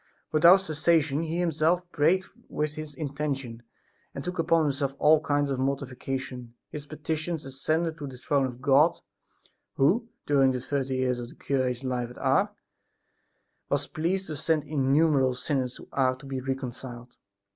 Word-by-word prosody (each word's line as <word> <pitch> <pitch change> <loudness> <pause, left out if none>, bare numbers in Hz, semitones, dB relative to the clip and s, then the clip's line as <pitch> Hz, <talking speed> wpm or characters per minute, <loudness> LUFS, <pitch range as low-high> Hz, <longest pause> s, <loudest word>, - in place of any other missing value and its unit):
Without 170 +5 +7
cessation 155 -3 +1
he 165 +1 -2
himself 170 +1 +2
prayed 175 +6 +3 0.2
with 150 0 -2
this 155 -2 -7
intention 140 -5 -4 0.5
and 140 - -5
took 180 -1 -4
upon 165 0 +3
himself 140 -2 -1
all 155 +1 +5
kinds 145 -2 0
of 130 - -1
mortification. 130 -2 -3 0.2
His 145 -1 -7
petitions 155 +1 -3
ascended 155 +5 -1
to 145 - -5
the 130 -2 -9
throne 135 +1 +1
of 125 0 -10
God, 145 +5 +5 0.8
who, 210 - +2 0.2
during 135 -2 +4
the 125 - -2
thirty 135 0 -2
years 130 -1 0
of 120 -1 -6
the - - -15
cure's 130 -2 -1
life 125 -2 -2
at 125 - -12
Ars, - - +2 1.2
was - - 0
pleased 185 +5 -1
to 155 - -5
send 155 +1 0
innumerable 140 -2 +2
sinners 130 -1 -2
to - - -12
Ars 130 -2 +1
to - - -12
be 135 -1 -4
reconciled. 125 -2 -6
140 Hz, 155 wpm, -27 LUFS, 130-155 Hz, 1.2 s, Without